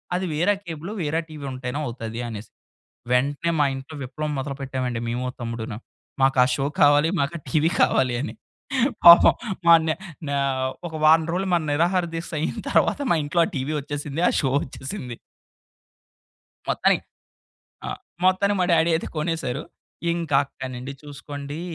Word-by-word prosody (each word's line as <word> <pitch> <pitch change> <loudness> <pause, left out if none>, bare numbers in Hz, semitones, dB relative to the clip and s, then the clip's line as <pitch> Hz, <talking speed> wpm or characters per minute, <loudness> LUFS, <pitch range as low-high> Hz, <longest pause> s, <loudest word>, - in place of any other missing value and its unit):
అది 185 +1 -1
వేరే 175 +7 +2
కేబులు 165 +2 -6
వేరే 160 +1 0
టీవీ 155 -3 -9
ఉంటేనే 130 +1 -4
అవుతాది 115 -1 -6
అనేసి. 110 -2 -7 0.6
వెంటనే 140 +6 +1
మా 145 - +5
ఇంట్లో 135 +4 -9
విప్లవం 150 +4 -4
మొదలుపెట్టామండి 130 -3 -3
మేము 120 +2 -2
మా 125 - -3
తమ్ముడు‌ను. 115 -2 -4 0.4
మాకా 135 -1 +5
షో 135 - -1 0.2
కావాలి 145 +2 +5
మా‌‌కా 140 +4 -1
టీవీ 160 +1 +2
కావాలి 125 -2 +3
అని. 145 - -5 0.7
పాపం 170 0 +10 0.3
మనే 165 -1 +6 0.3
నే 140 - -1 0.5
ఒక 165 - -10
వారం 160 +1 +6
రోజులు 190 +2 -1
మ‌న 170 -2 +2
నిరాహారదీక్ష 170 +1 0
అయిన 155 - -2
తరువాత - - +2
మా 170 - +4
ఇంట్లో 170 +4 +1
ఆ - - -5
టీవీ 135 +4 -2
వచ్చేసింది 145 +2 -4
ఆ - - +1
షో 135 - 0
వచ్చేసింది. 130 - -7 1.5
మొత్తానికి - - +2 0.8
ఆ! - - -3 0.4
మొత్తానికి 190 +2 +3
మా - - +3
డ్యాడీ 165 0 +4
అయితే 160 - -4
కొనేసారు. 155 -3 -2 0.5
ఇంకా 165 -4 0
అక్కడి 130 -1 -8
నుండి 130 +3 -6
చూసుకోండి 145 +1 -7
145 Hz, 145 wpm, -24 LUFS, 130-165 Hz, 1.5 s, పాపం